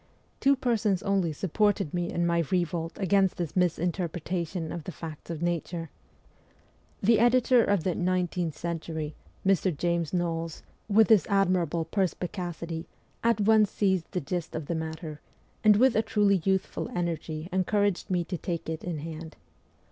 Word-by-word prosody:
Two 275 0 +4
persons 225 -7 +1
only 195 -4 +1
sup 155 +2 -5
ported 205 -6 +2
me 175 0 -1
in 170 - 0
my 170 0 +2
revolt 170 -2 -1
against 195 0 +2
this 170 -4 -3
misinterpretation 175 -1 -1
of 170 -3 -6
the - - -4
facts 160 -1 -9
of 165 -1 -4
nature. 170 -1 -2 1.1
The 225 +3 +5
editor 245 0 +5
of 200 -6 +1
the 185 - +1
' 180 - +2
Nineteenth 175 -3 -1
Century,' 160 -2 -4 0.3
Mr. 190 -4 +2
James 170 -2 0
Knowles, 165 -2 -2 0.3
with 220 +2 +5
his 215 -7 +5
admirable 180 -4 +2
perspi 180 0 -1
cacity, 170 -2 -5 0.4
at 230 -2 +3
once 215 0 +5
seized 190 -5 0
the 180 - -1
gist 170 +3 -4
of 160 -2 -3
the 170 - -2
matter, 160 -1 -5 0.4
and 215 -1 +7
with 255 +2 +4
a 220 - +4
truly 205 -4 +2
youthful 190 +4 0
energy 165 -2 -3
encouraged 200 +1 +1
me 180 -2 +1
to 175 0 -5
take 170 -2 -4
it 160 -1 -4
in 175 -3 -3
hand. 160 +1 -7
175 Hz, 160 wpm, -28 LUFS, 165-195 Hz, 1.1 s, and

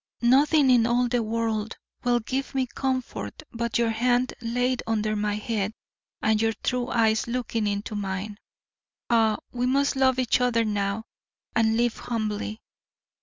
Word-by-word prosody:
Nothing 275 +3 +5
in 235 -2 +5
all 245 +1 +2
the 240 0 +1
world 225 -1 -2 0.3
will 245 -1 +3
give 265 +4 -3
me 265 -1 +2
comfort 260 +4 -3
but 235 -1 -1
your 235 -1 +2
hand 245 +2 +1
laid 245 +2 0
under 215 -1 0
my 210 0 0
head 210 -1 -2 0.5
and 215 0 +3
your 225 0 +2
true 250 -1 0
eyes 225 -2 +2
looking 235 -3 -1
into 205 +2 -2
mine. 200 +1 -4 0.7
Ah, 220 -2 +4
we 250 0 -1
must 280 +2 +2
love 260 -1 +3
each 255 -1 +2
other 235 -2 +2
now, 205 0 -1 0.5
and 225 0 +3
live 240 -1 +1
humbly! 215 -1 -3
230 Hz, 150 wpm, -26 LUFS, 215-250 Hz, 0.7 s, Nothing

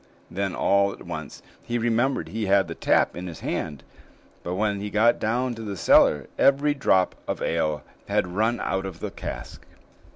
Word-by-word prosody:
Then 95 0 -2
all 100 0 +3
at - - -12
once - - -7 0.2
he 120 - -2
remembered 120 +3 0
he 110 -1 -3
had 95 -1 +4
the 85 - -5
tap - - +2
in 90 +1 -6
his 85 -3 -8
hand; 75 -4 -3 0.6
but 90 - -4
when 100 0 0
he 105 - -4
got 110 +3 +3
down 125 +3 0
to 115 - -8
the 100 -3 -5
cellar, 75 -3 +5
every 140 +2 +4
drop 95 -10 +2
of - - -2
ale 75 -2 -1 0.2
had - - +1
run 110 +7 0
out 95 0 -1
of 95 - -9
the - - -4
cask. - - -7
100 Hz, 185 wpm, -25 LUFS, 90-115 Hz, 0.6 s, cellar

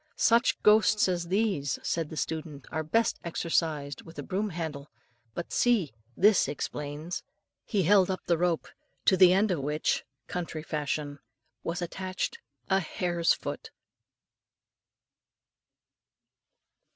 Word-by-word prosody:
"Such 235 +2 +3
ghosts 210 0 +5
as 175 -2 -1
these," 185 -8 0
said 165 -3 -1
the 160 - -8
student, 155 -4 -4
"are 160 - -1
best 225 +9 +1
exorcised 160 -4 -1
with 165 - -14
a - - -4
broom 205 +2 -2
handle; 160 -5 -5 0.5
but, 170 - -5
see! 225 - +2 0.3
this 205 +1 +5
explains." 150 +3 -4 0.4
He 200 -3 +1
held 195 +1 +5
up 185 - -2
the 170 - +3
rope, 175 -2 +1 0.4
to 190 - +6
the 185 -1 +7
end 195 +2 +3
of 175 - 0
which 150 +3 0 0.2
country 170 -3 -4
fashion 145 -2 -3 0.4
was 175 +4 -3
attached 185 - -3 0.3
a 190 0 +3
hare's 175 -1 +1
foot! - - -6
170 Hz, 125 wpm, -29 LUFS, 155-190 Hz, 0.5 s, the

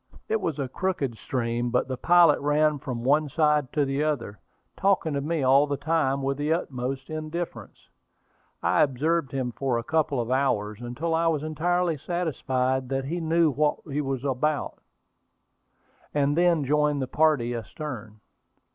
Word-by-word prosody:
It 220 -1 0
was 160 -6 -2
a 140 -2 -2
crooked 145 -4 -2
stream, 120 -1 -2
but 125 +1 +1
the 130 - -3
pilot 170 +2 +5
ran 150 +1 +2
from 125 -4 -5
one 145 +3 +2
side 150 -2 +2
to 145 -2 +2
the 135 +2 -1
other, 120 - -2 0.4
talking 190 -5 +1
to 140 - -1
me 155 0 -1
all 135 +3 +5
the 140 -1 -2
time 140 -2 0
with 135 0 -1
the 145 +2 -1
utmost 135 -3 -4
indifference. 155 +2 -5 0.9
I - - +3
observed 150 +2 +1
him 130 -3 -2
for 130 0 -1
a 115 - -3
couple 155 -3 0
of 120 +1 -2
hours, 110 -5 0
until 135 +8 -3
I 165 +1 +2
was 155 -3 0
entirely 170 +2 0
satisfied 130 -7 -1
that 135 0 -1
he 170 +5 -3
knew 165 0 +3
what 150 +2 +1
he 145 +2 0
was 135 -2 -3
about, 145 +2 -1 1.3
and 145 0 +2
then 170 -3 +3
joined 150 +1 +2
the 130 - -2
party 145 -4 +2
astern. 115 -2 -7
145 Hz, 165 wpm, -26 LUFS, 130-155 Hz, 1.3 s, pilot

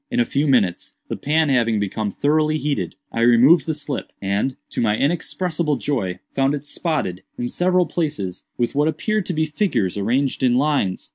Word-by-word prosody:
In 245 -1 -1
a 240 - +4
few 145 -7 0
minutes, 105 -10 +1
the - - -2
pan 155 +1 +1
having 115 -4 +2
become 105 +1 -2
thoroughly 155 +7 +1
heated, 150 -1 -2 0.2
I 115 - -2
removed 120 +9 +5
the 160 - 0
slip, 145 -2 -4
and, 100 +7 -1 0.2
to - - -2
my 110 -2 +2
inexpressible 165 +1 0
joy, 115 -9 -2 0.2
found 135 +1 +2
it 145 - -7
spotted, 145 - -2 0.2
in 120 0 -2
several 180 +3 +2
places, 150 - -3
with 120 -1 0
what 145 +2 +2
appeared 215 +4 -1
to 180 - -1
be 160 0 +1
figures 140 - -1
arranged 125 +7 0
in 125 -2 +3
lines. 135 -9 0
140 Hz, 185 wpm, -21 LUFS, 115-155 Hz, 0.2 s, removed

